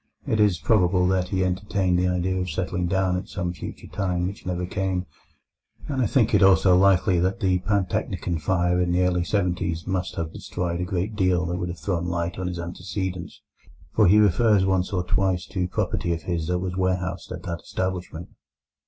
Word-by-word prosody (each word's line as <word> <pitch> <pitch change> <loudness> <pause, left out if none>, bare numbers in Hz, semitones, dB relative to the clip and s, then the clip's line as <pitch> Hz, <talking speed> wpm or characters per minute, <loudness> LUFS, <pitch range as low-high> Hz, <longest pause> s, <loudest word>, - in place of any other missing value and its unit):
It 110 - 0
is 105 -4 +4
probable 90 +1 +3
that 95 -1 +1
he 95 -1 0
entertained 95 -1 0
the 90 - +2
idea 90 +1 0
of 90 0 -2
settling 90 +2 -2
down 95 0 +1
at 90 - -6
some 90 -1 -3
future - - -8
time 90 -3 -2
which 95 0 -6
never 90 0 -2
came; 95 0 -2 0.8
and 135 -2 -1
I 120 - +3
think 115 0 +2
it - - +5
also 95 -1 +6
likely 95 -1 +4
that 95 +2 0
the 95 -1 +2
Pantechnicon 90 -3 -1
fire 90 +1 +1
in 90 -1 +1
the 90 +1 +3
early 90 -1 +1
seventies 90 -4 -1
must 95 -1 -2
have 80 -1 -4
destroyed 85 -1 -3
a - - -1
great 95 +4 -2
deal 90 -3 +2
that 90 +1 -2
would 90 -1 -3
have 85 - -6
thrown 85 +3 -2
light 85 0 -2
on 95 - -2
his 90 -1 -4
antecedents, 90 +1 -5 0.5
for 105 -3 +4
he 100 +4 +6
refers 105 0 +4
once 95 -1 +1
or 90 -3 0
twice 95 -1 +1
to 90 -3 -2
property 85 -1 -1
of 80 - -9
his 85 -3 -2
that 90 0 +1
was 90 0 -3
warehoused 90 -1 -1
at 90 -1 -6
that 85 -2 -4
establishment. 90 -2 -4
90 Hz, 195 wpm, -24 LUFS, 90-95 Hz, 0.8 s, also